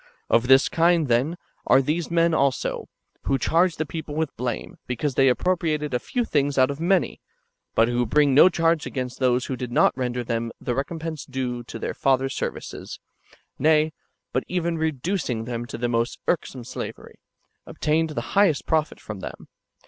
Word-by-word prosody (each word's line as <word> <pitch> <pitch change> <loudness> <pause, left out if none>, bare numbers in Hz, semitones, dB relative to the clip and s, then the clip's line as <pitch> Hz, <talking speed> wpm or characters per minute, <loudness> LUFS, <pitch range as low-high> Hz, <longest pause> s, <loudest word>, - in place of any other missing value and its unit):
Of 115 +2 +4
this 135 +1 +6
kind, 165 -2 +3
then, 130 +8 +1 0.3
are 130 - +6
these 155 +5 -1
men 170 0 +3
also, 140 -3 0 0.4
who 135 - +2
charge 170 +4 +2
the 155 - -2
people 155 -1 -6
with 160 -2 -2
blame, 125 0 -4
because 130 +3 -2
they 135 +1 +4
appropriated 155 0 0
a 125 - +1
few 245 - -2
things 145 -6 0
out 130 +1 +4
of 140 - -7
many, 180 +3 +1 0.5
but 115 - +5
who 120 0 0
bring 145 +3 +3
no 150 +7 +8
charge 165 -2 +1
against 125 -2 -4
those 125 -1 +2
who 130 - -3
did 125 -1 -5
not - - +4
render 125 -1 -2
them 115 -1 -2
the 125 - -2
recompense 160 +3 -4
due 125 -2 -3
to - - -7
their - - -3
fathers' 135 0 +1
services; - - -5 0.6
nay, 155 +1 +3 0.4
but - - +1
even 170 -2 -1
reducing 155 - -1
them 120 0 -4
to 115 - -6
the 120 +1 -1
most 115 0 0
irksome 135 -7 -1
slavery, - - -8 0.5
obtained 160 +1 0
the 120 -6 -5
highest 195 -7 +3
profit 155 -1 0
from 110 -3 -8
them. - - -9
140 Hz, 175 wpm, -24 LUFS, 125-160 Hz, 0.6 s, no